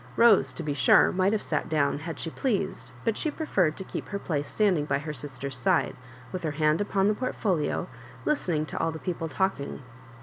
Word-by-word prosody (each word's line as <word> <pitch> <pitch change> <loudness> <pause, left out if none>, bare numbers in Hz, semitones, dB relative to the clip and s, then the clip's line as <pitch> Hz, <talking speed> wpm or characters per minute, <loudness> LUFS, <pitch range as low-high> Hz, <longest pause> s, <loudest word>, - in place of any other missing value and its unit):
Rose, 230 -4 +6
to 165 - -5
be 150 -2 -1
sure, 140 - +5
might 185 +1 +2
have 215 -1 0
sat - - -2
down 145 -2 +1
had 160 0 -6
she 165 - -4
pleased, 200 -6 -2 0.2
but 225 -2 +2
she 310 - -1
preferred 190 - 0
to - - -5
keep - - -6
her 200 - -2
place 145 -7 -2
standing 185 -5 +2
by - - +1
her 150 +2 -5
sister's 140 -1 -3
side, 125 - +1 0.4
with 185 - -4
her 160 - -1
hand 155 +3 +3
upon 200 -1 +1
the 210 - +4
portfolio, 205 -9 -1 0.4
listening 175 - +1
to - - -5
all. 165 - +1
the 160 - -6
people 165 -1 -3
talking. 150 -6 -2
165 Hz, 205 wpm, -27 LUFS, 150-200 Hz, 0.4 s, Rose